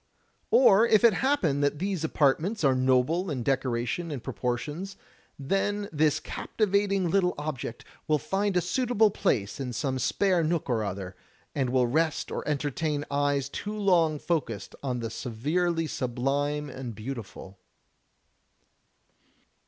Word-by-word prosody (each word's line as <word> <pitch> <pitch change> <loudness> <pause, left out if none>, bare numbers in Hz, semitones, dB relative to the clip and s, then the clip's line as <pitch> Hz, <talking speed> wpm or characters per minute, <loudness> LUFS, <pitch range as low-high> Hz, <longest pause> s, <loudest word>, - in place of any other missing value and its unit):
Or 230 -3 +6
if 215 -1 +4
it 230 -2 +7
happen 180 - +1
that 145 +1 +1
these 185 -1 -2
apartments 160 +7 +1
are 135 -2 +5
noble 130 +8 +2
in 130 -5 -3
decoration 130 +5 -1
and 140 -6 -5
proportions, 150 +10 -3 0.4
then 200 +7 -1
this 150 -1 +2
captivat 200 -1 -1
ing 190 -4 +1
little 180 -2 +2
object 145 -6 -5 0.2
will 155 - +3
find 195 +5 -1
a - - +3
suitable 220 +3 +2
place 110 - -1
in 125 -2 -4
some 130 0 -2
spare 180 - +2
nook 165 0 0
or 115 -4 0
other, 95 -2 -5 0.4
and 135 -3 0
will 125 0 +3
rest 155 +5 0
or - - -2
entertain 145 0 -1
eyes 140 -1 +1
too 210 +8 -5
long 175 -7 +3
focused 140 - -2
on 125 -3 -2
the 115 -1 -4
severely 160 +9 -1
sublime 140 +3 -1
and 130 -4 -7
beautiful." 105 -4 -8
150 Hz, 135 wpm, -27 LUFS, 130-180 Hz, 0.4 s, it